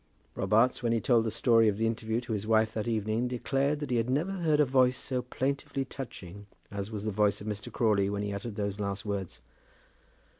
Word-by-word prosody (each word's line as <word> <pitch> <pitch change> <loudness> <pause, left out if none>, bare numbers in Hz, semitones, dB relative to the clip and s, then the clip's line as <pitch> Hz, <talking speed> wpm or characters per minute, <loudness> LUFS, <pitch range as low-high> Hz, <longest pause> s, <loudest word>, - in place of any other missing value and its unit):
Robarts, 115 +4 +2
when 120 -1 +1
he 115 - +2
told 115 -1 +3
the - - +1
story 115 0 +4
of 100 -2 +1
the 115 - +1
interview 115 +1 -1
to 120 -2 -4
his 105 0 -3
wife 110 0 +3
that 110 +1 -3
evening, 110 +1 0
declared 135 +4 0
that 145 - -4
he 120 - +2
had 115 +1 0
never 150 +9 0
heard 165 -6 +1
a 150 - +6
voice 130 -1 +3
so 125 -1 -2
plaintively 135 +2 -2
touching 100 -7 -8 0.2
as 100 0 -4
was 105 -2 -5
the 110 - 0
voice 105 0 +2
of 105 - -9
Mr. 105 -2 -5
Crawley 105 -4 +2
when 100 0 -2
he 100 -1 -3
uttered 100 +2 -5
those 100 -1 -3
last 100 +1 -3
words. 100 -3 -4
115 Hz, 220 wpm, -29 LUFS, 105-125 Hz, 0.2 s, a